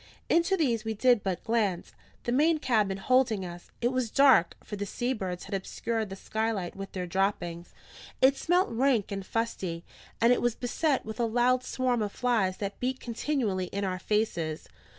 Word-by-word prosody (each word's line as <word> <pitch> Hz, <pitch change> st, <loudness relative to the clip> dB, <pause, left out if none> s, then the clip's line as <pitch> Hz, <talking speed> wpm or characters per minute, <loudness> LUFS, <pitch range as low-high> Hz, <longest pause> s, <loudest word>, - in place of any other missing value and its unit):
Into 340 Hz, +3 st, +3 dB
these 240 Hz, -9 st, +1 dB
we 220 Hz, -1 st, -3 dB
did 245 Hz, 0 st, +4 dB
but 190 Hz, -2 st, -3 dB
glance: 210 Hz, -6 st, 0 dB, 0.3 s
the 240 Hz, -, -2 dB
main 310 Hz, +6 st, +4 dB
cabin 215 Hz, -9 st, +1 dB
holding 225 Hz, -2 st, +2 dB
us. 175 Hz, 0 st, -9 dB
It 240 Hz, +1 st, +2 dB
was 255 Hz, -3 st, -1 dB
dark, 260 Hz, -10 st, +5 dB
for 210 Hz, -, -6 dB
the 205 Hz, 0 st, -4 dB
sea 245 Hz, +6 st, -1 dB
birds 185 Hz, -6 st, -4 dB
had 195 Hz, -, -8 dB
obscured 220 Hz, +3 st, -2 dB
the 195 Hz, -, -6 dB
skylight 220 Hz, -2 st, -2 dB
with 195 Hz, 0 st, -7 dB
their 185 Hz, -1 st, -3 dB
droppings; 175 Hz, -2 st, -2 dB, 0.4 s
it 265 Hz, +1 st, +5 dB
smelt 355 Hz, +6 st, +2 dB
rank 235 Hz, -3 st, +1 dB
and 195 Hz, -1 st, -3 dB
fusty; 185 Hz, -6 st, -3 dB, 0.3 s
and 235 Hz, +2 st, +5 dB
it -, -, 0 dB
was 240 Hz, -1 st, +1 dB
beset 270 Hz, +4 st, 0 dB
with 220 Hz, +1 st, -7 dB
a 235 Hz, -, +2 dB
loud 245 Hz, +2 st, +2 dB
swarm 255 Hz, -2 st, 0 dB
of 205 Hz, -1 st, -1 dB
flies 220 Hz, -7 st, +1 dB
that 200 Hz, -1 st, -5 dB
beat 255 Hz, +1 st, -1 dB
continually 235 Hz, -6 st, -1 dB
in 200 Hz, +2 st, -3 dB
our 185 Hz, -1 st, -2 dB
faces. 175 Hz, -8 st, -1 dB
220 Hz, 185 wpm, -28 LUFS, 195-250 Hz, 0.4 s, dark